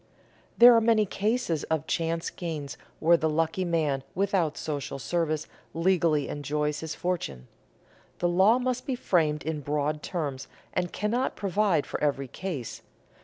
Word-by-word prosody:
There 240 0 +9
are 230 - +5
many 220 -1 +4
cases 205 - -1
of 160 -1 -1
chance 165 0 -1
gains 155 -5 -5 0.2
where 170 +2 +5
the 160 -1 0
lucky 165 +4 0
man 155 -6 0
without 185 -4 +1
social 145 -3 -4
service 155 +4 -1 0.3
legally 165 -4 +2
enjoys 150 +1 -2
his 160 0 -5
fortune. 70 - -3 0.7
The 175 - +1
law 190 +7 +5
must 255 0 -2
be 265 - 0
framed 160 - +1
in 155 -1 -3
broad 150 +1 -1
terms, 145 -7 -4 0.3
and 180 -1 -1
cannot 235 +5 -1
provide 195 -5 +1
for - - -5
every 140 -2 0
case. 145 -5 -5
165 Hz, 145 wpm, -27 LUFS, 150-190 Hz, 0.7 s, There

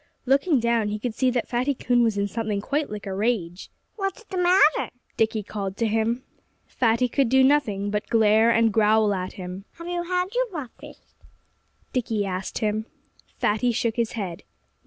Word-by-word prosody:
Looking 275 +3 +3
down, 235 -2 +1
he 210 0 -2
could 230 +2 -4
see 255 +3 +1
that 245 -1 -1
Fatty 255 +3 0
Coon 245 0 +2
was 225 -3 +2
in 200 0 +1
something 215 0 -2
quite 285 +8 -2
like 210 -1 -7
a 195 - -4
rage. 190 -4 -2 0.3
"What's 390 +2 -3
the 385 - -8
matter?" 360 -2 +4 0.3
Dickie 220 -1 0
called 195 -1 -5
to 230 - +1
him. 225 +3 0 0.4
Fatty 235 +1 +1
could 265 0 +1
do 265 +1 +5
nothing 220 -8 +2
but 210 0 -3
glare 220 0 +4
and 230 -2 +3
growl 215 -1 +3
at 185 -1 -4
him. 185 +1 -7
"Have 335 0 -10
you 350 0 -2
had 360 +2 -2
your - - +1
breakfast?" 300 - -10 0.8
Dickie 225 -5 -1
asked 185 0 -4
him. 215 +1 -1 0.5
Fatty 220 +4 +1
shook 230 -1 -1
his 235 -2 -1
head. 190 -7 -5
230 Hz, 180 wpm, -24 LUFS, 210-265 Hz, 0.8 s, do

